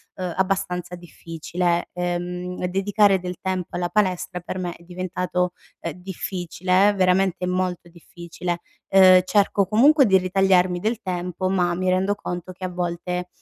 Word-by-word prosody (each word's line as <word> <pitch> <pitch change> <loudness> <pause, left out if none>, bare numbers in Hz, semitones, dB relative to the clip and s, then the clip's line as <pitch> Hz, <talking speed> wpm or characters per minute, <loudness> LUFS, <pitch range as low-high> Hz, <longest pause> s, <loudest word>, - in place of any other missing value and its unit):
uhm, 180 -2 -4
abbastanza 185 -2 -1
difficile. 170 0 -3
Uhm, 180 +1 -3
dedicare 195 +1 +3
del 180 0 -5
tempo 185 -2 -3
alla 175 0 -1
palestra 185 -3 0
per 175 - -6
me 180 -2 -4
è 170 - -18
diventato, 180 0 -2 0.3
uhm, 170 - -3
difficile, 185 +1 0
veramente 185 -1 +2
molto 180 -1 -2
difficile. 170 0 -6 0.3
Uhm, 185 -1 +8
cerco 200 -1 +2
comunque 275 +7 +5
di 190 -3 +5
ritagliarmi 185 -1 +2
del 225 +4 -2
tempo, 180 0 -3
ma 180 -2 +1
mi 185 +1 -1
rendo 190 +2 +1
conto 180 -2 -6
che, 185 - -13
a - - -3
volte, 180 0 -3
180 Hz, 145 wpm, -23 LUFS, 175-190 Hz, 0.3 s, Uhm